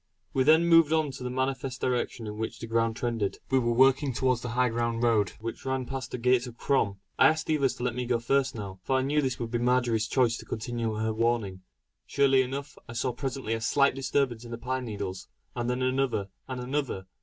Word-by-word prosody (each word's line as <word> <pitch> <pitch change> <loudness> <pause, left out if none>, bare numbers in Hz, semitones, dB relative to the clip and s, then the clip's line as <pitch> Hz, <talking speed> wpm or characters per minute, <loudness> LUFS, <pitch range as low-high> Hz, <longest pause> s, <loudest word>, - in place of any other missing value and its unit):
We 135 - +2
then 160 +4 +5
moved 165 -2 +6
on 160 -1 +3
in 125 - -8
the 125 - -2
manifest 130 0 -2
direction 125 -2 -1
in 105 0 -6
which 110 - -3
the - - -7
ground 115 0 +1
trended; 115 -4 -2
we 135 - +4
were 120 -1 +1
working 135 +3 +4
towards 130 -1 +1
the 125 - -4
high 125 0 +4
road 115 -3 +1
which 115 +1 -6
ran 130 -1 -1
past 130 -2 -5
the - - -4
gates 125 +1 +2
of 120 -1 -10
Crom. 100 -9 +1 0.2
I - - +8
asked 155 0 +1
the 155 - +1
others 135 -2 +1
to 120 - -6
let 125 -2 0
me 125 0 -3
go 120 -1 +2
first 135 +3 +1
now, 100 -3 -7
for 130 - 0
I 130 - +1
knew 150 +3 +2
this 130 -3 -1
would 115 -1 -5
be 120 - 0
Marjory's 120 -2 +2
chance 120 -1 +2
to - - -10
continue 115 0 -3
her 110 +1 -1
warning. 110 -5 0 0.5
Surely 135 -1 +4
enough, 140 +3 -5
I - - -6
saw 120 +2 -1
presently 130 -3 -3
a 115 - -2
slight 140 +4 +3
disturbance 130 -3 -1
in 120 - -10
the 115 - -5
pine 130 +1 -3
needles, 100 -4 -5 0.3
and 120 0 -2
then 125 +1 -1
another 130 -6 0 0.2
and 130 -1 -4
another. 125 -6 -2
125 Hz, 230 wpm, -28 LUFS, 115-130 Hz, 0.5 s, I